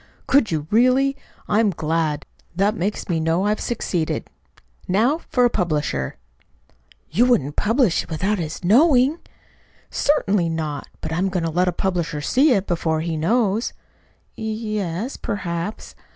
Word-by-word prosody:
"Could 275 -5 +3
you, 155 -3 -2
really? 255 +4 +4 0.3
I'm 215 0 +3
glad. 160 -3 -1 0.3
That 200 +3 +2
makes 205 +2 -2
me 170 -4 0
know 165 +4 +1
I've 210 +1 +1
succeeded. 180 -8 -2 0.6
Now 230 - +2
for 250 -1 +3
a - - +4
publisher!" 150 - -1 0.9
"You 225 +10 +4
wouldn't 170 - +2
publish 225 - +2
it - - -12
without 190 +6 -1
his 160 +1 -5
knowing?" 265 - +4 0.7
"Certainly 205 - +1
not. 155 -3 -3
But 160 - -4
I'm 185 +4 +1
going 180 -2 -1
to 165 - -1
let 180 +3 +1
a - - +3
publisher 175 -4 -2
see 265 - +3
it, 200 -5 +2
before 160 -3 0
he 165 0 -2
knows." 215 +6 +1 0.6
"Y - - -8
yes, 215 -1 -3
perhaps." 175 0 -4
190 Hz, 145 wpm, -22 LUFS, 165-230 Hz, 0.9 s, really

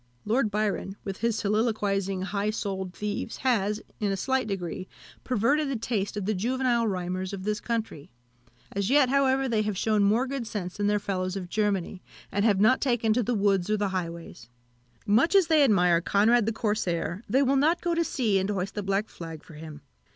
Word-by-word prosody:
Lord 230 +1 +1
Byron, 205 -2 -2
with 195 -1 -5
his 230 -1 0
soliloquising, 200 -3 0
high 200 +1 -1
souled 195 -4 -3
thieves, 210 +1 -4
has, 215 -4 0 0.2
in 205 -2 0
a 195 - -1
slight 260 +4 0
degree, 185 -2 -4 0.4
perverted 270 +5 +1
the 275 - -1
taste 215 -3 -2
of 205 - -3
the 215 - +1
juvenile 240 +3 +1
rhymers 185 0 -3
of 190 -1 -5
his 210 0 -1
country. 225 -11 -4 0.6
As 200 +1 -1
yet, 275 -1 +4
however, 270 0 +2
they 225 -3 +1
have 210 -2 -2
shewn 215 +1 +1
more 220 +6 +3
good 265 -3 -4
sense 185 -5 -5
than 205 0 0
their 210 0 +2
fellows 185 -2 -2
of 185 -3 -5
Germany, 200 -2 -1 0.3
and 200 - 0
have 205 -4 +3
not 220 +6 +4
taken 240 -4 +2
to 245 - +1
the 245 +1 -1
woods 195 -2 +1
or 215 - +2
the 205 -1 0
highways. 170 -9 -6 0.6
Much 235 - +3
as 390 -3 +6
they 315 -2 +4
admire 180 -8 +4
Conrad 215 +5 +3
the - - +2
Corsair, 205 -5 -2
they 270 +2 +3
will 275 +1 +2
not 315 +6 +3
go 345 -1 -1
to 335 0 +2
sea, 225 -11 +1
and 190 +1 -2
hoist 195 -1 -2
the 205 - -3
black 195 +2 -1
flag 165 -2 -9
for - - -14
him. 155 -1 -10
210 Hz, 200 wpm, -27 LUFS, 190-235 Hz, 0.6 s, as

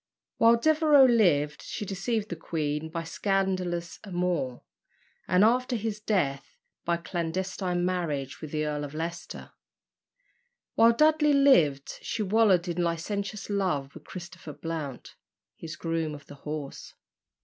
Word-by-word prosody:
While 230 +1 +6
Devereux 300 0 +5
lived, 160 - +3
she 210 - -5
deceived 210 +3 -2
the 170 - -3
queen 155 -1 -3
by 165 +1 -4
a - - -12
scandalous 185 -2 -1
amour, 175 -10 -2 0.6
and, 180 +2 +4
after 250 +3 +3
his 220 -1 -3
death, 170 -11 -1 0.3
by 170 - +1
a - - -3
clandestine 175 +1 -2
marriage 150 -7 -2
with 155 - -6
the 155 0 -1
Earl 150 -1 -2
of 145 +1 -7
Leicester. 170 +2 -6 1.2
While 230 +1 +6
Dudley 305 +2 +4
lived, 170 - +3
she 220 - -2
wallowed 200 -3 +3
in 175 0 -1
licentious 200 +5 -3
love 180 -9 -1
with - - -13
Christopher 175 -3 -9
Blount, 150 -3 -6 0.4
his 160 -2 -8
groom 165 -1 -2
of 145 - -13
the - - -12 0.2
horse. 150 -2 -6
175 Hz, 140 wpm, -28 LUFS, 155-210 Hz, 1.2 s, While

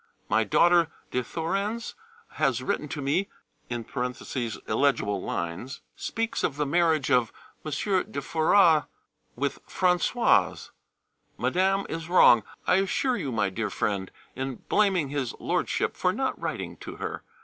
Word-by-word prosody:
My 110 - +3
daughter 170 - +4 0.2
de 125 - +1
Thorens 195 - -2 0.4
has 135 -5 0
written 150 - -1
to 145 -1 -5
me 150 +9 0 0.4
(illegible 120 -1 -1
lines), 85 +10 -4
speaks 225 0 -2
of 140 - 0
the 150 +1 0
marriage 160 -1 +2
of 125 -3 +3 0.3
M. 155 - -4 0.4
de 140 - -3
Foras 160 +2 +4 0.5
with 140 +2 -2
Françoise. 180 +6 +2 0.7
Madame 195 +2 +1
is 165 0 -5
wrong, 120 -10 +7 0.2
I 180 - +4
assure 220 +7 +1
you, 135 - -3
my 105 -4 0
dear 110 +2 -2
friend, 100 -2 -2 0.3
in 130 0 -3
blaming 190 -8 +2
his 140 -4 -2
Lordship[B] - - -1
for - - +1
not - - -2
writing - - -4
to - - -8
her. - - -5
150 Hz, 130 wpm, -27 LUFS, 125-180 Hz, 0.7 s, wrong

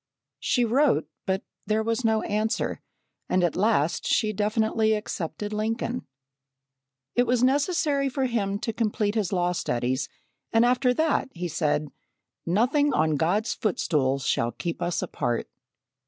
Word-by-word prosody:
She 245 -2 +2
wrote, 245 - +2 0.2
but 190 +1 0 0.2
there 215 +1 +1
was 230 +3 -1
no 220 -1 +2
answer 215 +2 -1 0.5
and 185 0 +2
at 175 - +1
last 185 -6 +1
she 215 -2 +2
definitely 220 +1 +1
accepted 205 -1 -4
Lincoln. 225 +3 -2 1.1
It 245 0 +2
was 245 0 +2
necessary 280 0 +2
for 265 0 -1
him 205 -5 0
to 225 - -2
complete 210 -2 0
his 215 -5 -1
law 180 -2 +1
studies, 130 -4 -1 0.4
and 225 +1 +4
after 250 +1 +3
that, 315 -3 +1
he 175 0 -3
said, 150 -2 0 0.6
"Nothing 255 - +3
on 155 -1 +2
God's 180 - +1
footstool 150 -9 0
shall 120 -3 0
keep 170 -2 -4
us 175 -1 -1
apart." 120 -4 -2
215 Hz, 140 wpm, -26 LUFS, 170-240 Hz, 1.1 s, and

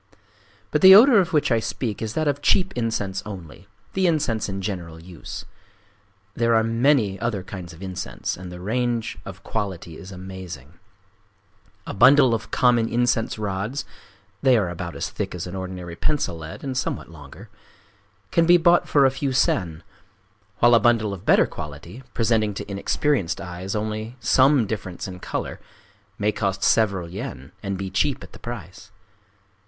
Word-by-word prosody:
But - - +1
the 190 0 +11
odor 230 +1 +8
of 185 -1 0
which 150 -4 +2
I 115 - +4
speak 110 -1 -4
is 110 0 -4
that 155 -1 0
of 145 0 0
cheap 190 +3 +3
incense 110 -5 -2
only,—the 95 - -5
incense 135 -11 0
in 95 0 -4
general 90 -5 -5
use. 85 0 -9 0.9
There 115 +1 +2
are 110 - +4
many 115 -3 +2
other 110 -5 -2
kinds 90 -2 -8
of 85 +3 -12
incense; 95 -1 -4
and 90 0 -9
the 90 - -8
range 115 +4 -2
of - - -9
quality 95 -6 -4
is 95 +1 -10
amazing. 90 -6 -9 1.1
A - - -5
bundle 130 +3 +6
of 115 0 -3
common 120 -2 +3
incense 120 -1 +1
rods—(they 105 +1 -2
are 100 -5 0
about 85 0 -6
as - - -4
thick - - -4
as 85 - -5
an 90 +1 -7
ordinary 90 -2 -6
pencil 145 - -1
lead, 80 0 -9
and 135 -2 -3
somewhat 125 - -3
longer)—can 95 - -6
be 175 0 +8
bought 175 +1 +3
for 140 -2 +5
a 135 - +4
few 135 +1 -2
sen; 85 -10 0 0.7
while 120 0 +5
a 115 - +7
bundle 115 -4 +2
of 95 0 -10
better - - +6
quality, 75 - -9
presenting 110 -3 +1
to - - -6
inexperienced 100 - 0
eyes 90 +3 -5
only 110 +2 -3
some 130 0 +4
difference 95 -4 -5
in 90 -1 -8
color, - - -4 0.6
may 105 +1 +1
cost 95 -2 -2
several 100 -6 +2
yen, 105 +10 -7
and 100 -2 -3
be 95 -1 -5
cheap 145 -3 0
at - - -13
the - - -12
price. 105 -4 -8
105 Hz, 160 wpm, -23 LUFS, 95-125 Hz, 1.1 s, the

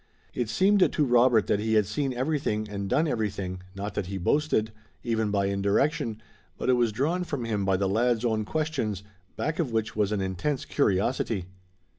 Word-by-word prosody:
It 120 -3 -2
seemed 195 - +4
to 150 - +1
Robert 120 -3 +4
that 100 - +1
he 110 +1 0
had 105 -2 +4
seen 130 +7 -1
everything 125 -5 -1
and 100 -1 -4
done 160 +9 +2
everything, 100 -7 -2
not 100 +1 -4
that 100 -2 -3
he 100 +1 -4
boasted, 110 - +1 0.3
even 110 -3 0
by 100 -1 +1
indirection, 105 +4 0 0.3
but - - -2
it - - +5
was 120 -2 +2
drawn 155 +11 0
from 145 -8 -4
him 105 -3 -1
by 95 -1 +2
the 100 +1 0
lad's 115 +3 +1
own 110 -2 +1
questions, 125 - -2 0.3
back 155 +3 -2
of 150 -8 0
which 110 0 -1
was 105 -1 +1
an 105 - 0
intense 95 +10 -2
curiosity. 100 0 0
110 Hz, 185 wpm, -27 LUFS, 100-130 Hz, 0.3 s, it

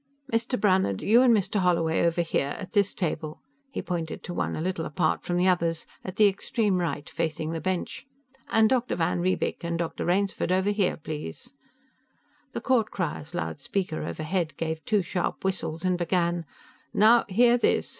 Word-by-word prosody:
"Mr. 230 +2 0
Brannhard, 185 - +2
you 230 +4 +6
and 255 -2 +6
Mr. 210 -1 +2
Holloway 170 -3 +2
over 170 0 +2
here, 145 -4 -1
at 190 -2 -8
this 200 -2 +2
table." 155 -3 -3 0.3
He 275 - -5
pointed 165 -3 -4
to 175 - -5
one - - -1
a - - -4
little 180 -1 -2
apart 155 0 0
from 175 - -1
the 180 +1 +3
others, 170 -3 +1 0.2
at 185 - -6
the 210 0 +6
extreme 200 0 0
right 160 -4 -2
facing 160 -1 -2
the 165 -1 -3
bench. 185 +7 -3 0.4
"And 220 0 +5
Dr. 250 +1 +1
van 170 0 0
Riebeek, 185 0 -1
and 170 0 -1
Dr. 170 -1 -3
Rainsford 190 0 +1
over 190 +2 +2
here, 200 -3 +1
please." 150 - -7 1.0
The - - -3
court 240 -5 +2
crier's 160 -2 -4
loud 160 - -3
speaker, 180 +2 -2
overhead, 155 +1 -2
gave 160 -1 -3
two 210 -4 +2
sharp 175 0 -2
whistles 170 -3 -2
and 180 -1 +1
began: 175 -1 0 0.5
"Now 230 +3 +6
hear 240 +5 +5
this! - - +2
180 Hz, 175 wpm, -27 LUFS, 165-200 Hz, 1.0 s, you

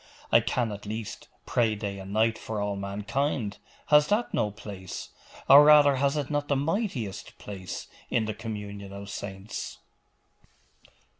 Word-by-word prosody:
'I - - +8
can, 120 -3 0
at 105 0 -7
least, 110 0 -5 0.2
pray 115 -3 +2
day 100 -2 -4
and 95 0 -8
night 110 +2 +3
for 110 -1 -4
all 100 0 -1
mankind. 105 +4 -2 0.3
Has 150 0 +6
that 215 +4 +1
no 105 - +1
place 100 -3 -8 0.4
or 140 +2 +10
rather, 145 -2 +7
has 140 +2 +2
it 145 0 -2
not 145 0 0
the 140 - +2
mightiest 140 - -2
place 95 -3 -7 0.2
in 115 - +1
the 110 - -2
communion 105 -2 -6
of 100 0 -7
saints! 100 +2 -6
110 Hz, 150 wpm, -28 LUFS, 100-140 Hz, 0.4 s, or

